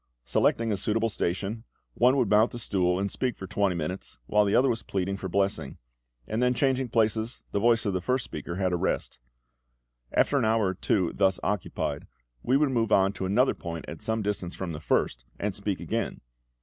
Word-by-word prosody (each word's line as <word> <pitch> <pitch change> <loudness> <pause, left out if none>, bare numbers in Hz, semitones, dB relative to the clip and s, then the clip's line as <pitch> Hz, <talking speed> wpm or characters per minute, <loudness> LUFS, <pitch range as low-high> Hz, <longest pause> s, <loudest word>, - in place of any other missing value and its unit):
Selecting 115 -1 +2
a 100 - 0
suitable 110 +4 0
station, 100 +3 -2 0.3
one 125 +3 +4
would 125 -4 +2
mount 105 +3 +5
the - - -7
stool 90 -5 +1
and 100 +1 -1
speak 125 -3 -2
for 95 - -6
twenty 100 -1 0
minutes, 85 +4 -5
while 105 +7 +3
the 100 - +2
other 130 - +5
was 115 -3 0
pleading 100 -1 -2
for 95 -1 -5
blessing; 95 -7 -1 0.5
and 110 +2 -1
then 125 0 +3
changing 130 -1 +1
places, 110 +1 0
the 100 - 0
voice 115 +1 +3
of 100 - 0
the 90 - -1
first 125 +7 0
speaker 85 - -6
had 95 -1 0
a - - +2
rest. 85 - -2 0.9
After 140 - +3
an - - 0
hour 110 -3 +2
or - - -1
two 95 -1 0
thus 95 -2 +2
occupied, 105 -4 -2 0.3
we 130 +2 +3
would 145 -1 +2
move 115 -3 0
on 95 0 +4
to 95 - -3
another 125 +8 +3
point 85 -1 -6
at - - -8
some 110 -1 -1
distance 100 -3 -3
from 95 -3 -4
the 75 - -5
first, - - 0 0.2
and 105 -1 -1
speak 100 -1 -2
again. 115 -1 -3
105 Hz, 205 wpm, -27 LUFS, 95-115 Hz, 0.9 s, mount